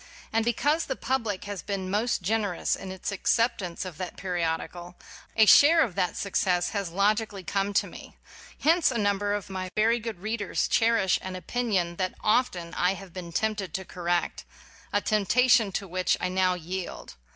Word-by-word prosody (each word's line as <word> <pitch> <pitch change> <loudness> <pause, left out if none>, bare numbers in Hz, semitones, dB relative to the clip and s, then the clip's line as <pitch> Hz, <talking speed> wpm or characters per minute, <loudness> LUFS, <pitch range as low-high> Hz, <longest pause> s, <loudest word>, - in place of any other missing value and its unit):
And 225 0 +2
be 240 - +2
cause 300 +7 +1
the 265 - -2
public 225 -9 -2
has 205 -2 -5
been 195 -2 -4
most 210 -1 0
gener 205 -2 0
ous - - +1
in 190 - -8
its 190 +2 -4
acceptance 200 -3 0
of 175 -4 -8
that 185 -2 -5
periodical, 175 0 -3 0.4
a 220 - +7
share 320 +8 +7
of 230 -9 -3
that 180 - -1
success 180 -3 0
has 200 -4 -3
logically 205 +2 0
come 195 +2 -1
to - - +3
me. - - -12 0.4
Hence 330 +2 +4
a 250 - -2
number 205 -1 +1
of 205 - -5
my 185 -1 -5
very 225 +2 +3
good 225 -4 -6
readers 215 +1 -1
cherish 225 -5 +3
an 185 0 -6
opinion 185 -3 -1
that 185 -1 -2
often 185 -7 +1
I 180 +2 +1
have 195 -3 -11
been 175 -2 -7
tempted 205 -2 -2
to 190 - -4
correct, 175 -1 -2 0.5
a 205 - +1
temptation 225 +2 +3
to 195 - -3
which 185 0 0
I 180 - -1
now 185 0 +2
yield. 180 +2 -6
195 Hz, 180 wpm, -27 LUFS, 180-225 Hz, 0.5 s, a